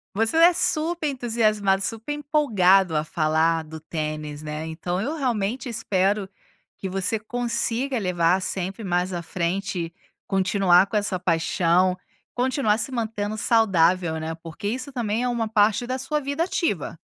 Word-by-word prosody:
Você 225 +8 +1
é 340 +2 +7
super 335 -2 0
entusiasmado, 215 -7 +1
super 225 +8 -3
empolgado 195 - +3
a 150 - +1
falar 160 +1 +1
do 160 +1 -9
tênis, 155 -2 -5
né, 155 +1 -5
então, 175 +3 -3
eu 285 +9 -2
realmente 245 -3 -1
espero 205 -3 0 0.5
que 190 - -5
você 195 +4 -1
consiga 245 +3 -2
levar 180 -1 +2
sempre 190 +3 -4
mais 180 -1 0
à 175 - -3
frente, 170 0 -3 0.3
continuar 190 -1 +4
com 205 - -6
essa 205 -3 -1
paixão, 180 +1 +2 0.4
continuar 250 -4 +1
se 230 +4 -2
mantendo 220 -3 -3
saudável, 185 -7 +2
né. 160 +1 -4
Porque 165 +4 -7
isso 255 +5 -3
também 235 -2 -1
é - - +1
uma 235 -2 -1
parte 215 +1 +2
da 255 - -2
sua 285 +4 -1
vida 285 +3 -1
ativa, 260 - -2
200 Hz, 145 wpm, -24 LUFS, 175-240 Hz, 0.5 s, é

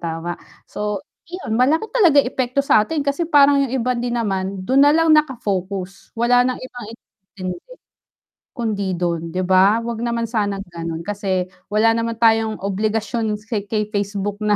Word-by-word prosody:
tama. 165 +1 -4 0.4
So 210 -1 -3 0.3
'yon, 355 -11 -5
malaki 315 +11 +2
talaga 355 - +4
yung - - -1
epekto 255 +1 0
sa 215 - +5
atin, 295 +2 -2
kasi 300 +4 -1
parang 285 -2 +5
yung - - -8
iba 250 +2 0
din 240 0 -2
naman 195 -4 -2
dun 265 +5 +3
nalang 315 +3 +5
nakafocus 200 -10 -1
wala 245 +1 +4
nang 250 0 +1
ibang 245 -3 -9 0.5
inintindi 185 - -6 0.8
kundi 215 -5 -2
dun, 170 -1 -2
'di 185 - 0
ba? 190 +4 +5
'Wag 235 -1 -4
naman 235 -1 -1
sanang 205 -3 -2
ganon, 165 0 -5
kasi 195 -3 -1 0.2
wala 215 +2 +3
naman 230 0 -2
tayong 225 -1 +3
obligasyon 215 +2 -1
sa 210 0 -4
kay 210 +1 -2
Facebook 205 0 -2
na 210 -1 +2
220 Hz, 160 wpm, -20 LUFS, 195-245 Hz, 0.8 s, sa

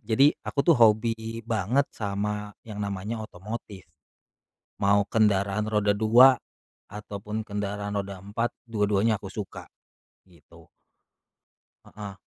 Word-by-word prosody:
Jadi, 135 +6 +5
aku - - -7
tuh, 170 - +7
hobi 115 -1 +4 0.3
banget 115 +5 +1
sama 105 0 -3 0.2
yang 105 -2 -5
namanya 100 +3 -4
otomotif. 105 -2 -8 0.9
Mau 100 +1 +4
kendaraan 105 -1 +2
roda 105 -1 +2
2 115 +5 +6 0.5
ataupun 105 +1 -6
kendaraan 105 0 -3
roda 100 -1 -3
4, 105 +5 -2 0.2
dua-duanya 105 -1 +1
aku 100 -1 -9
suka, 100 0 -7 0.6
gitu. 85 -5 -19 1.2
Heeh. 100 -2 -9
105 Hz, 105 wpm, -26 LUFS, 100-110 Hz, 1.2 s, tuh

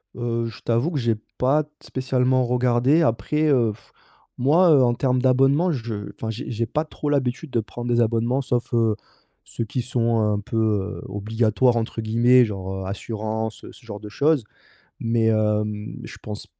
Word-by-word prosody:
Heu, 115 -1 -2
je 115 -1 -10
t'avoue 120 +8 0
que 145 - -1
j'ai 115 -2 +1 0.2
pas 140 +4 +2
t 150 - -23 0.2
spécialement 130 -1 +1
regardé 125 +5 +3
après, 150 +3 +1
heu, 120 -6 +3 0.6
moi, 160 +7 +4
heu, 140 -3 +6
en 120 -1 +3
termes 125 0 +1
d'abonnement 135 +7 +3
je 115 -6 -4
enfin 110 - -5
j'ai 115 +5 -5
j'ai 115 0 -1
pas 155 +7 -2
trop 150 -1 -5
l'habitude 140 +2 -1
de 115 - +1
prendre 120 +2 -6
des 120 - +3
abonnements 115 +3 +1
sauf, 120 -1 -2
heu, 115 -2 +2 0.5
ceux 115 - -5
qui 125 +3 -3
sont 115 -2 0
un 105 -1 +1
peu, 105 +2 -5
heu, 105 -3 0
«obligatoires» 110 +4 +1
entre 115 0 -2
guillemets. 120 +3 +4
Genre, 95 -2 -5
heu, - - -7
assurance, 110 +2 -4
ce 120 - -16
genre 105 -2 -7
de 105 - -8
choses. 145 +4 +2 0.6
Mais 115 0 +1
hem, 105 -1 0
je - - -9
pense 105 -1 -6
120 Hz, 175 wpm, -23 LUFS, 110-130 Hz, 0.6 s, heu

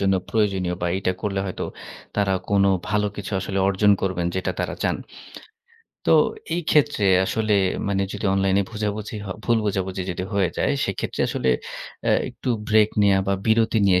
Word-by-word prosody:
জন্য 95 0 +2
প্রয়োজনীয় 95 -5 0
বা 85 - +1
এটা 95 -1 0
করলে 100 -2 -1
হয়তো 95 - -4 0.5
তারা 100 -2 +2 0.2
কোনো 100 -1 +4 0.2
ভালো 105 0 +1
কিছু 105 +1 -6
আসলে 95 +1 -3
অর্জন 100 +1 +4
করবেন 90 -3 0
যেটা 95 - -1
তারা - - -2
চান। - - +1 1.1
তো - - +5 0.4
এই 175 - -1
ক্ষেত্রে 145 -8 +3 0.2
আসলে 110 +2 0 0.4
মানে 100 -1 +1
যদি 105 - -6
অনলাইনে 95 0 +2
বোঝাবুঝি 105 0 -3
হ - - -8 0.2
ভুল 115 -1 +3
বোঝাবুঝি 95 -2 -1
যদি 90 +1 -3
হয়ে 95 -4 +2
যায় - - +2
সেক্ষেত্রে 95 - -3
আসলে 65 - -1 0.6
অ্যা - - +3 0.2
একটু - - -7 0.2
ব্রেক 110 -1 +5
নেয়া 100 -1 +4
বা 100 - +2
বিরতি 115 0 +3
নিয়ে 90 -1 +4
100 Hz, 165 wpm, -23 LUFS, 95-105 Hz, 1.1 s, তো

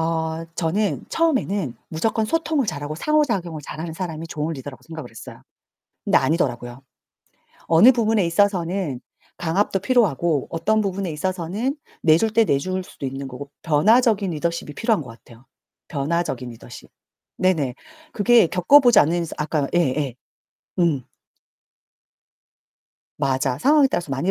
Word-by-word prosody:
어 160 0 -2
저는 185 +5 -1
처음에는 205 - 0
무조건 220 +7 0
소통을 315 0 0
잘하고 145 -3 -4
상호작용을 200 - 0
잘하는 160 +3 -6
사람이 165 -2 -5
좋은 155 +2 -3
리더라고 135 -1 -9
생각을 160 -7 -8
했어요. 110 - -11 0.6
근데 - - +4
아니더라고요. 125 -6 -1 0.9
어느 175 +10 +7
부분에 225 -5 +1
있어서는 175 -5 0 0.4
강압도 180 +4 0
필요하고, 175 - +1
어떤 215 +7 +1
부분에 195 -3 -2
있어서는 185 - -2 0.3
내줄 165 +8 +4
때 230 - +5
내줄 185 +5 -1
수도 145 - -9
있는 135 +1 -5
거고, 135 +2 -9
변화적인 205 +5 +3
리더십이 170 -1 -3
필요한 225 - +1
것 125 - -12
같아요. 115 +1 -16 0.4
변화적인 145 -3 -2
리더십. 120 +1 -12 0.5
네네. 160 -10 +1 0.4
그게 230 -2 +5
겪어보지 240 - +5
않은 170 +3 +2
이상 165 - -7
아까 150 -2 -1
예예. 140 -6 0 0.6
음. 160 -7 +2 2.2
맞아. 130 -1 0
상황에 290 - +5
따라서 170 -4 -2
많이 135 +8 -1
170 Hz, 325 characters per minute, -22 LUFS, 145-205 Hz, 2.2 s, 어느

